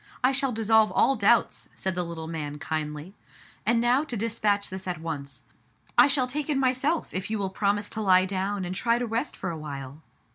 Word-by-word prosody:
I 255 - +5
shall 270 0 0
dissolve 220 -1 +3
all 270 - +4
doubts/* 220 +2 +2
said 190 - -2
the 180 - -1
little 170 -2 -5
man 150 -3 -5
kindly. 150 +3 -4 0.5
"And 235 +1 +4
now 245 +4 +3
to 245 -6 -3
dispatch 205 -2 0
this 190 0 -6
at 175 -3 -3
once. 140 -5 -6 0.5
I 245 - +7
shall 275 -2 +2
take 285 +4 -3
it 290 - +1
myself, 270 +5 0
if 185 +2 -3
you 220 - -1
will 195 -2 -2
promise 205 +1 0
to 220 - -3
lie 185 -2 +5
down 195 0 -2
and 180 - -4
try 230 +5 +1
to 245 - -1
rest 230 +5 -2
for 190 - -3
awhile. 145 -2 -7
200 Hz, 205 wpm, -26 LUFS, 170-240 Hz, 0.5 s, I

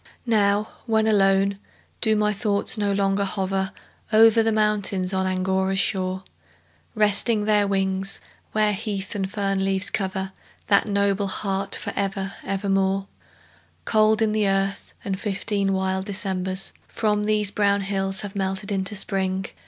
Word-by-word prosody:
Now, 210 -2 +2 0.2
when 220 -1 +2
alone, 195 -2 +2 0.4
do 220 -2 +3
my 210 0 +1
thoughts 205 -1 +1
no 205 -2 0
longer 195 0 +1
hover 195 0 -2 0.4
Over 225 +1 +6
the 225 0 +1
mountains 205 -3 0
on 190 0 0
Angora's 190 +1 0
shore, 190 -2 0 0.7
Resting 210 +1 +3
their 210 -1 +3
wings, 195 0 0 0.3
where 215 -1 +2
heath 200 -1 -4
and 195 -2 -3
fern 195 -2 -1
leaves 195 +1 +4
cover 190 -1 -3 0.3
That 200 +1 +3
noble 200 0 +1
heart 195 0 -2
for - - -5
ever, 195 -1 -2
ever 195 +1 -3
more? 195 0 +1 0.8
Cold 215 0 +3
in 215 - +1
the 215 -1 +1
earth, 195 +1 -2
and 190 -1 -3
fifteen 200 -1 -1
wild 190 0 -1
Decembers 190 -2 -2
From 210 -1 -1
these 210 -1 +2
brown 200 -1 +2
hills 195 -1 -1
have 205 0 -7
melted 195 +1 -2
into 195 +1 -1
Spring. 190 -1 -1
200 Hz, 145 wpm, -23 LUFS, 190-210 Hz, 0.8 s, Over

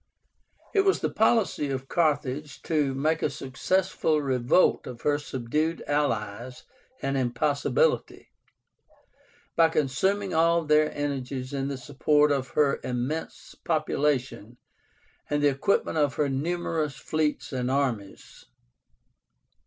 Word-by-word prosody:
It 400 - +5
was 390 0 +2
the - - -1
policy 220 -9 +2
of 135 0 -4
Carthage 150 -3 -1
to 145 -5 0
make 155 +4 0
a - - +1
successful 155 +4 0
revolt 130 +4 +2
of 120 -2 -8
her 145 0 +1
subdued 150 +4 -2
allies 120 -4 -2 0.4
an 135 0 0
impossibility, 145 - 0 1.2
by 165 -1 +5
consuming 185 +7 0
all 165 +1 +3
their 150 0 +3
energies 135 -2 -3
in 135 -1 -2
the 140 -1 -3
support 145 +2 +2
of 135 -2 0
her 145 -2 +3
immense 125 +6 -4
population 135 -7 -1 0.7
and 145 0 0
the 145 - +6
equipment 155 +3 0
of 145 -2 +1
her 150 -2 +1
numerous 155 +1 -2
fleets 155 -2 -2
and 125 -1 -1
armies. 125 -8 -3
145 Hz, 115 wpm, -26 LUFS, 130-155 Hz, 1.2 s, the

